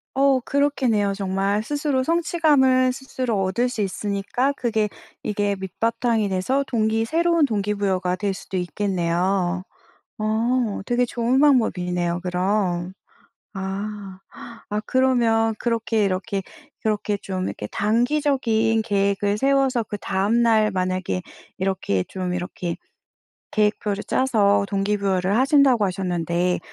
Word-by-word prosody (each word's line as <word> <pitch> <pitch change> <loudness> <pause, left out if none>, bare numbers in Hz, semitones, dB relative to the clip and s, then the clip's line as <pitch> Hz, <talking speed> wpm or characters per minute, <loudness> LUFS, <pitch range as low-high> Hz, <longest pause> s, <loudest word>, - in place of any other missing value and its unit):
어 270 0 +4
그렇겠네요 250 -7 +1
정말. 195 +1 -1
스스로 285 0 -1
성취감을 290 -6 +3
스스로 255 -5 -3
얻을 215 +7 0
수 245 -4 -3
있으니까 200 +6 -1
그게 220 -3 0 0.4
이게 205 -1 0
밑바탕이 225 +2 0
돼서 225 +10 0
동기 220 -1 +1
새로운 335 +2 +2
동기부여가 200 -5 -1
될 200 -2 -1
수도 190 - -6
있겠네요. 180 0 0 0.6
어 220 +1 0
되게 245 0 +1
좋은 240 +2 0
방법이네요 180 -11 +2
그럼. 180 -1 -1 0.6
아. 195 0 -5 0.5
아 210 +1 -1
그러면 235 -4 +2
그렇게 230 -2 0
이렇게 195 +1 -1 0.4
그렇게 210 -1 -1
좀 185 -1 -4
이렇게 105 - -5
단기적인 230 - +1
계획을 200 -1 0
세워서 270 -2 +2
그다음 205 +2 0
날 220 -2 +3
만약에 185 -1 -1 0.4
이렇게 185 - -1
좀 185 -1 -4
이렇게 175 -1 -4 0.8
계획표를 210 -1 0
짜서 210 -6 +2
동기부여를 195 -1 0
하신다고 265 -4 +4
하셨는데 180 -2 -1
210 Hz, 280 characters per minute, -23 LUFS, 190-245 Hz, 0.8 s, 어